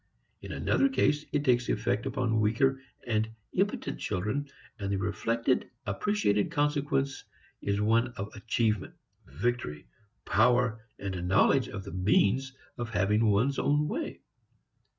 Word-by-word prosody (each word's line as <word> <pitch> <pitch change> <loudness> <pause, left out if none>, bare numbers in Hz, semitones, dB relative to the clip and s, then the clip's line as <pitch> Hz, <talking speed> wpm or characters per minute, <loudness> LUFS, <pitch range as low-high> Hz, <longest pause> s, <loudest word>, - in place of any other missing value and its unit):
In - - -8
another 275 - +2
case, 150 - +1
it 145 -1 0
takes 120 -2 +3
effect 110 +1 0
upon 115 -3 0
weaker 130 +5 +2 0.2
and 110 -2 0 0.2
impotent 195 +3 -1
children, 105 +9 -2 0.3
and 100 -1 -2
the 100 - +1
reflected 115 +5 0 0.2
appreciated 105 - +1
consequence 145 -2 0 0.4
is 100 0 0
one 115 +3 +3
of 100 +2 -5
achievement, 110 -1 -1 0.3
victory, 80 - -2 0.4
power 115 +2 +3
and 100 -1 -4
a 90 - -4
knowledge 100 +8 +3
of 100 -2 -6
the - - -8
means 100 +8 +2 0.3
of 120 -1 -3
having 105 +1 +2
one's 115 +7 +2
own 150 +1 +2
way. - - -4
115 Hz, 130 wpm, -29 LUFS, 100-135 Hz, 0.4 s, takes